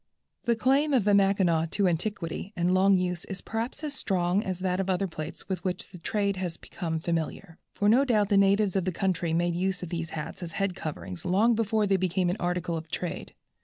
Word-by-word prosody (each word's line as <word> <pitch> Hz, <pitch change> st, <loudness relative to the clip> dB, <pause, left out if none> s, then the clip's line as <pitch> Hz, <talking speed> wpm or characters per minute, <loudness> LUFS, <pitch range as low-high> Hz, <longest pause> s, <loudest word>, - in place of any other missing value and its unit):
The 235 Hz, -, +3 dB
claim 275 Hz, +5 st, +3 dB
of 240 Hz, -, +3 dB
the 205 Hz, +1 st, +3 dB
Mackinaw 195 Hz, -5 st, +3 dB
to 200 Hz, +2 st, +1 dB
antiquity 180 Hz, +1 st, -2 dB
and 175 Hz, +1 st, +1 dB
long 190 Hz, +1 st, +5 dB
use 180 Hz, -1 st, -1 dB
is 195 Hz, -, -6 dB
perhaps 230 Hz, +7 st, -4 dB
as 295 Hz, -2 st, -3 dB
strong 185 Hz, -6 st, +1 dB
as 185 Hz, -2 st, -3 dB
that 185 Hz, 0 st, 0 dB
of 195 Hz, 0 st, -1 dB
other 185 Hz, +1 st, +1 dB
plaits 160 Hz, -3 st, -7 dB
with 190 Hz, -2 st, -3 dB
which 185 Hz, +1 st, -3 dB
the 180 Hz, -, -10 dB
trade 200 Hz, +2 st, 0 dB
has 180 Hz, -3 st, -3 dB
become 165 Hz, -2 st, -4 dB
familiar, 165 Hz, +1 st, -3 dB, 0.2 s
for 205 Hz, -, +1 dB
no 240 Hz, +6 st, +6 dB
doubt 215 Hz, -7 st, +2 dB
the 205 Hz, -, +3 dB
natives 200 Hz, 0 st, +3 dB
of 190 Hz, -2 st, +1 dB
the 185 Hz, -, 0 dB
country 180 Hz, -2 st, -1 dB
made 170 Hz, +1 st, +1 dB
use 185 Hz, +1 st, -1 dB
of 175 Hz, -, -5 dB
these 165 Hz, -1 st, -3 dB
hats 150 Hz, -, -6 dB
as 170 Hz, -2 st, -6 dB
a -, -, -9 dB
head 195 Hz, -2 st, 0 dB
covering 145 Hz, -, -6 dB
long 210 Hz, +6 st, +3 dB
before 220 Hz, -1 st, +1 dB
they 195 Hz, -1 st, +3 dB
became 185 Hz, -1 st, +1 dB
an 185 Hz, -, -3 dB
article 175 Hz, -1 st, -1 dB
of 160 Hz, 0 st, -6 dB
trade. 175 Hz, -, -5 dB
185 Hz, 225 wpm, -28 LUFS, 175-200 Hz, 0.2 s, no